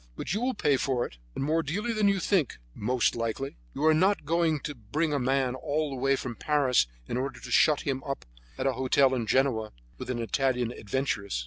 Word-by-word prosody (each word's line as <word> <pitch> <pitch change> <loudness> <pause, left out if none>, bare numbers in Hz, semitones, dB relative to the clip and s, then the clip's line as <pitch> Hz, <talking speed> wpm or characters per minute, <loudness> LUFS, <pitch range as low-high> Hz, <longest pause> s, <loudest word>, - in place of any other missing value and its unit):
But - - -3
you 210 - -1
will 255 0 0
pay 145 -9 +2
for 130 -2 0
it, - - -11 0.2
and - - -2
more 160 +3 +2
dearly 205 +10 -2
than 215 -2 +2
you 200 -1 +3
think, 180 -5 +1 0.2
most 125 +3 +1
likely. 115 +4 -3 0.2
You 150 - -1
are 160 - +6
not 185 +1 +2
going 165 -1 +2
to 150 - -4
bring 145 +7 -2
a 145 - +1
man 130 0 +1
all 150 +2 -2
the - - -4
way 135 +1 +3
from 125 -2 -4
Paris 135 - +2 0.2
in - - -2
order 130 0 -3
to 125 - -9
shut 150 +3 +4
him 135 -2 -2
up 140 -1 -4 0.3
at 130 - -2
a 135 - +2
hotel 130 +1 +3
in 120 -4 -1
Genoa 120 -5 +1 0.3
with - - -6
an 125 - -1
Italian 125 0 0
adventuress." 100 - -2
135 Hz, 220 wpm, -28 LUFS, 125-155 Hz, 0.3 s, are